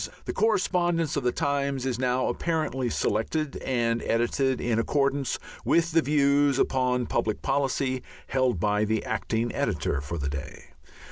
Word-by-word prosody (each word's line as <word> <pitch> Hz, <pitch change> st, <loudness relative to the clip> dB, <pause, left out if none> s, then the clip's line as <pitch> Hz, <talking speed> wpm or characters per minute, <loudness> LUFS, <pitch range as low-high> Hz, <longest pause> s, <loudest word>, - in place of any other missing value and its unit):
The -, -, -3 dB
correspondence 175 Hz, -7 st, +1 dB
of -, -, 0 dB
the 125 Hz, -1 st, +1 dB
Times 140 Hz, -2 st, -1 dB
is 125 Hz, -2 st, -1 dB
now 125 Hz, 0 st, +1 dB
apparently 135 Hz, -2 st, -1 dB
selected 135 Hz, +9 st, -1 dB
and 115 Hz, -2 st, 0 dB
edited 125 Hz, +3 st, +1 dB
in 115 Hz, -2 st, 0 dB
accordance 140 Hz, +1 st, 0 dB, 0.3 s
with 170 Hz, 0 st, +2 dB
the 165 Hz, +1 st, +4 dB
views 140 Hz, -2 st, +3 dB
upon 125 Hz, -2 st, +1 dB
public 110 Hz, -1 st, -1 dB
policy 135 Hz, -2 st, 0 dB, 0.2 s
held 130 Hz, -7 st, +1 dB
by 105 Hz, +2 st, +1 dB
the 110 Hz, 0 st, 0 dB
acting 115 Hz, +1 st, -1 dB
editor 70 Hz, -, -1 dB
for 80 Hz, +4 st, -5 dB
the 70 Hz, -2 st, -2 dB
day. 70 Hz, +2 st, -7 dB
130 Hz, 145 wpm, -27 LUFS, 115-145 Hz, 0.3 s, the